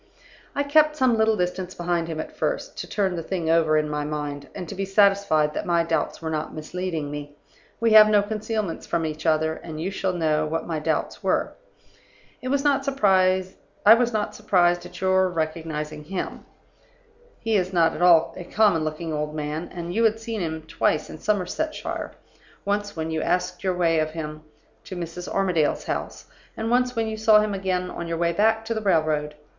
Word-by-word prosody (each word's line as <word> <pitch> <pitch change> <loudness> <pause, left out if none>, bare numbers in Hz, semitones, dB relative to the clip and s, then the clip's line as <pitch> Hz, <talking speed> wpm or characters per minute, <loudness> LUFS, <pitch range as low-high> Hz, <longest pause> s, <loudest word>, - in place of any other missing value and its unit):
"I 285 - +1
kept 300 +1 +4
some 260 -5 +3
little 220 -1 +2
distance 180 0 -2
behind 175 -1 -1
him 160 -2 -4
at - - -6
first, - - -2
to - - -5
turn 195 -3 0
the 170 - -3
thing 165 -1 -2
over 160 -2 +3
in 155 0 +1
my 150 0 -2
mind, 145 -1 -4
and 180 -3 -6
to - - -6
be 195 0 -3
satisfied 195 -6 +3
that - - -4
my 170 -1 +3
doubts 165 - -2
were 160 - -2
not 155 0 -3
misleading 160 -1 -4
me. 145 0 -7 0.4
We 230 -1 +2
have 215 0 +9
no 205 -1 +4
concealments 215 -3 -3
from 170 -1 0
each 155 +1 -4
other; 160 0 +2
and 160 -2 -8
you 180 +5 -2
shall 190 -1 -1
know 155 -3 +1
what 160 +1 -2
my 160 -2 -2
doubts 155 0 -2
were. - - 0 0.9
"I - - -4
was 275 +1 +1
not 280 -2 +2
surprised 190 -8 +2 0.3
at 210 -6 +3
your 190 0 +3
recognizing 155 -2 -4
him; 190 +3 -5 0.9
he 225 -1 0
is 185 -2 +1
not 170 -3 +3
at - - -6
all 170 -2 +5
a 180 - -7
common 200 -3 +2
looking 155 +1 -4
old 150 0 -3
man; 155 +2 -4
and 175 -1 -5
you 225 +4 +1
had 225 0 +2
seen 225 -2 -4
him 160 -2 -3
twice 155 0 0
in - - -9
Somersetshire 210 - -2 0.5
once 205 0 -1
when 160 0 -3
you 160 0 -1
asked 180 +1 -1
your 185 -1 0
way 165 -2 +2
of 155 0 0
him 155 -1 -6 0.4
to 185 - -7
Mrs. 175 0 -6
Armadale's 180 -6 +1
house, - - -4 0.3
and 225 +1 -2
once 250 0 +2
when 225 -1 0
you 220 0 -4
saw 215 -1 +6
him 210 -1 0
again 185 -2 -2
on 170 - -5
your 165 0 -2
way 170 0 +1
back 220 +4 +2
to 230 - -1
the 220 - -3
railroad. 155 -6 +1
180 Hz, 195 wpm, -24 LUFS, 160-210 Hz, 0.9 s, have